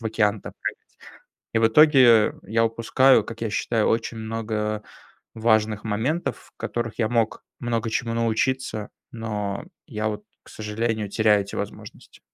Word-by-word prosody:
в - - -12
океан-то 105 -2 0
прыгать". - - -6 0.6
И 115 - +3
в 115 - +5
итоге, 150 +4 +6 0.3
э, - - -8
я 115 +2 +1
упускаю, 115 +4 +4
как 115 0 -9
я 115 - -1
считаю, 110 +1 0
очень 115 0 0
много, 110 0 -4 0.3
э, - - -22 0.5
важных 110 -2 +2
моментов, 120 +11 -2
в - - -63
которых 120 -1 -4
я 110 - +2
мог 115 -2 0 0.2
много 115 -2 -1
чему 115 +1 -1
научиться, 115 -1 -1 0.2
но 105 -3 -4 0.2
я, 110 -5 -2
от, 105 - -5 0.2
к - - -17
сожалению, 110 0 -2
теряю 105 -1 +3
эти 100 - -9
возможности. - - -8
115 Hz, 155 wpm, -24 LUFS, 110-115 Hz, 0.6 s, итоге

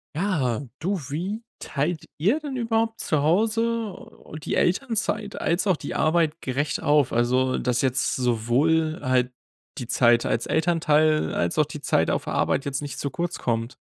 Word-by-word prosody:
Ja, 150 - 0 0.2
du, 190 +4 -1
wie 185 +10 -3 0.2
teilt 155 +3 -2
ihr 205 - +2
denn 280 -3 -5
überhaupt 225 -1 0
zu 155 -3 0
Hause 220 +5 +1 0.5
die - - -2
Elternzeit 215 0 0
als 175 +5 +1
auch 185 -4 +3
die - - -6
Arbeit 160 0 +1
gerecht 140 +3 -2
auf? 145 -2 +3
Also, 125 +2 +2
dass 125 -1 0
jetzt 130 +1 +1
sowohl 130 +7 +1
halt 130 -2 +1 0.5
die 125 - -5
Zeit 120 -1 +3
als 115 - -1
Elternteil, 155 -1 +2
als 85 - -1
auch 155 - +4
die 150 +1 -8
Zeit - - +1
auf - - -1
Arbeit 135 - 0
jetzt 140 0 -2
nicht 145 -1 -6
zu 140 - -2
kurz 175 +5 -3
kommt. 115 0 -2
155 Hz, 160 wpm, -24 LUFS, 130-190 Hz, 0.5 s, auch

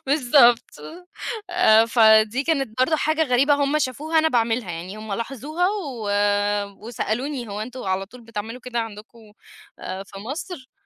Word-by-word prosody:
بالضبط. 255 -3 +4 0.8
آآ، 225 -12 +5
فدي 220 +1 +4
كانت 270 -8 -1
برضو 315 +4 +3
حاجة 310 +1 +1
غريبة 270 +3 +3
هم 285 +1 +1
شافوها 305 +4 -1
أنا 320 0 +3
باعملها، 230 - 0
يعني 175 +5 -7
هم 215 -1 -7
لاحظوها 275 - -2
و 275 - -4 0.8
وسألوني 240 +2 -3
هو 205 +1 -5
إنتم 250 +3 -6
على 190 0 -2
طول 250 +4 -14
بتعملوا 225 +2 -7
كده 245 -1 -4
عندكم، 220 0 -10 0.5
آآ 190 +1 -6
في 195 0 -12
مصر؟ 275 - -7
245 Hz, 145 wpm, -23 LUFS, 220-285 Hz, 0.8 s, آآ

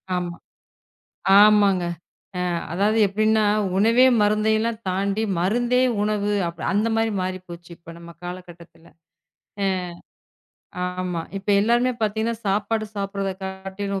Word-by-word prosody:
ஆமா 175 -1 -3 1.0
ஆமாங்க. 205 -3 +5 0.5
அ - - -1 0.3
அதாவது 205 +5 +1
எப்டின்னா 215 +2 +2 0.3
உணவே 230 +5 +5 0.2
மருந்தயெல்லாம் 220 +2 +1
தாண்டி 200 +3 -1 0.2
மருந்தே 240 +7 +1 0.2
உணவு. 210 0 0 0.2
அப்டி 170 0 -7
அந்த 210 +3 +1
மாரி 225 0 +1
மாறிப்போச்சு 185 -2 -6
இப்ப 165 0 -12
நம்ம 170 0 -11
காலகட்டத்துல. 175 -2 -10 0.8
அ. - - +2 1.3
ஆமா 180 -2 -3 0.2
இப்ப 195 - -15
எல்லாருமே 240 +4 +2
பாத்தீங்கன்னா 220 +2 -1
சாப்பாடு 210 +2 0
சாப்பிடுறதை 195 -1 -3
காட்டிலும் 190 +1 -5
200 Hz, 105 wpm, -23 LUFS, 185-220 Hz, 1.3 s, ஆமாங்க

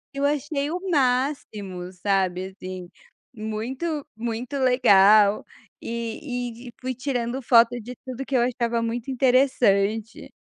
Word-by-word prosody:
Eu 280 - 0
achei 290 0 -1
o 350 +3 -3
máximo 250 - -1
sabe, 185 -1 0
assim, 185 -2 -7 0.5
muito 255 +8 -4
muito 235 +4 -4
legal, 215 -5 +5 0.4
e 235 +1 -5
e - - -15
fui 255 0 -3
tirando 250 -1 -3
foto 240 -1 +4
de 245 +3 -8
tudo 255 0 -5
que 270 0 -3
eu 240 - +3
achava 235 -1 0
muito 235 +3 -3
interessante. 235 -5 +2
240 Hz, 120 wpm, -24 LUFS, 215-260 Hz, 0.5 s, legal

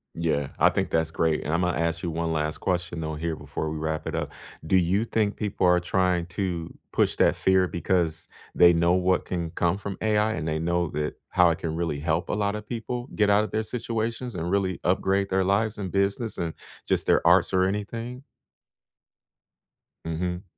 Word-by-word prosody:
Yeah. 80 -4 0
I - - +6
think - - -2
that's 80 -1 +1
great, 80 -1 0
and 75 - -2
Imma 90 +1 +2
ask 85 0 -1
you 85 - -1
one 85 0 -2
last 75 -1 -1
question, 90 -2 -2
though, 80 -1 -3
here 80 +1 -2
before 80 0 -4
we 80 - -4
wrap 80 0 -3
it - - -4
up. - - -2 0.4
Do - - +2
you 95 +5 +2
think 110 -3 0
people 105 -3 -1
are 90 0 +5
trying 90 -1 +1
to 85 -2 -4
push - - +2
that - - +3
fear 95 -1 +3
because 85 -2 -1 0.3
they 85 0 +7
know 85 +1 +3
what 90 0 +2
can 85 -3 -3
come 85 +3 +1
from 100 -1 -5
AI, 110 0 +2
and 80 - -3
they 80 0 -1
know 85 0 0
that 75 0 -2
how 90 -1 +5
it 80 - 0
can 80 -1 -3
really 80 -4 -2
help 80 +2 -1
a - - 0
lotta 105 0 -1
people 120 +2 -5
get 105 -1 +3
out 105 +1 +4
of 110 - -4
their 110 0 -1
situations 115 0 -3
and 85 0 -3
really 95 -2 0
upgrade 95 +2 +1
their 95 0 +2
lives 105 +3 +1
and 95 -3 -4
business 100 +3 0
and 85 -2 -2 0.3
just - - 0
their - - +3
arts - - +5
or 95 0 +3
anything? 115 +6 -3 1.8
Mhm. 90 +3 -3
90 Hz, 200 wpm, -26 LUFS, 85-100 Hz, 1.8 s, they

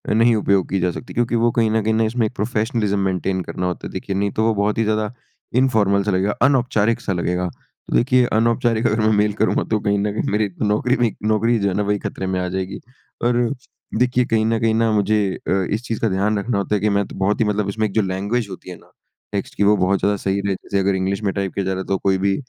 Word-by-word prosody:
नहीं 115 +1 +4
उपयोग 100 -3 +1
की 95 - 0
जा 90 0 +1
सकती 120 - -8
क्योंकि 120 0 0
वो 115 +1 +3
कहीं 115 -2 +3
न 110 0 +2
कहीं 110 +1 +2
इसमें 115 +1 0
एक - - -10
प्रोफ़ेशनलिज़्म 105 -2 -1
मेंटेन 95 0 -1
करना 90 - -4
होता 90 - -4
है - - -11
देखिए 95 +1 -4
नहीं 100 +1 0
तो - - +3
वो 110 0 +3
बहुत 105 +1 0
ही 115 - +2
ज़्यादा 110 +1 -1 0.5
इन्फ़ॉर्मल 105 -6 +2
सा 105 - 0
लगेगा 95 +2 +1
अनौपचारिक-सा 115 -6 +2
लगेगा 90 +1 -1
तो - - -9
देखिए 125 0 +4
अनौपचारिक 115 +1 +2
अगर 110 0 0
मैं 110 0 +3
मेल 105 0 +2
करूँगा 110 - +2
तो 110 - +2
कहीं 100 -1 0
न 105 +1 0
कहीं - - -2
मेरी 105 0 +1
नौकरी 110 +5 +2
पे 120 - 0
ही 110 - -2
नौकरी 115 +2 +2
जो 100 - +1
है - - -2
ना, 105 - +1
वही 105 0 0
ख़तरे 95 - -4
में 95 0 -1
आ 90 - -2
जाएगी 95 +1 -4 0.4
और 120 0 +2 0.6
देखिए 125 0 +2
कहीं 110 -2 +1
न 115 0 +1
कहीं 115 -1 +2
ना 115 0 +2
मुझे 105 0 +2 0.3
अ, - - 0 0.2
इस 110 - -1
चीज़ 115 -2 -3
का 115 - +2
ध्यान 100 +3 +1
रखना 110 +1 -1
होता 100 +1 0
है 100 - -1
कि 105 - +2
मैं 100 0 +1
तो - - -11
बहुत 95 +2 0
ही 115 - +3
मतलब 105 -1 0
इसमें 110 +2 -1
एक 100 - -10
जो 110 - +3
लैंग्वेज 100 +4 -1
होती 95 -1 -9
है 90 - -7
ना? - - -23 0.4
टेक्स्ट 100 - -3
की 100 - +1
वो 105 +1 +5
बहुत 95 +1 +2
ज़्यादा 100 0 +1
सही 95 0 -1
रहे। 100 - +1
जैसे 100 - -3
अगर 95 0 +1
इंग्लिश 95 +2 -1
में 100 - +1
टाइप 100 -2 -2
किया 100 - -2
जा 95 - -1
रहा 95 - -4
है - - -7
तो 95 - +1
कोई 95 0 +1
भी 100 +1 +1
105 Hz, 265 wpm, -20 LUFS, 95-110 Hz, 0.6 s, वो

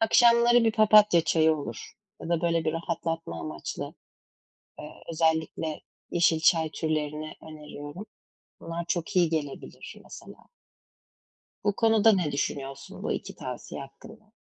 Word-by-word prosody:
akşamları 235 +1 +5
bir 225 - +3
papatya 210 -4 +6
çayı 160 -1 +3
olur 115 -6 -7 0.3
ya - - -6
da, 170 -1 +1
böyle, 165 -1 +1
bir 155 - 0
rahatlatma 165 - -3
amaçlı, 75 -1 -6 0.9
eee, - - -8 0.2
özellikle 160 -1 0 0.3
yeşil 170 -2 +3
çay 160 -1 +3
türlerini 155 0 -3
öneriyorum. 150 +4 -9 0.5
Bunlar 165 +1 -5
çok 175 +3 -2
iyi 175 -2 +5
gelebilir 145 -4 -5
mesela. - - -13 1.2
Bu 205 -1 +1
konuda 225 -1 +5
ne 175 -6 0
düşünüyorsun, 140 -1 -4
bu - - -1
2 - - -5
tavsiye 125 +2 -7
hakkında? 215 +11 -13
165 Hz, 125 wpm, -27 LUFS, 150-205 Hz, 1.2 s, papatya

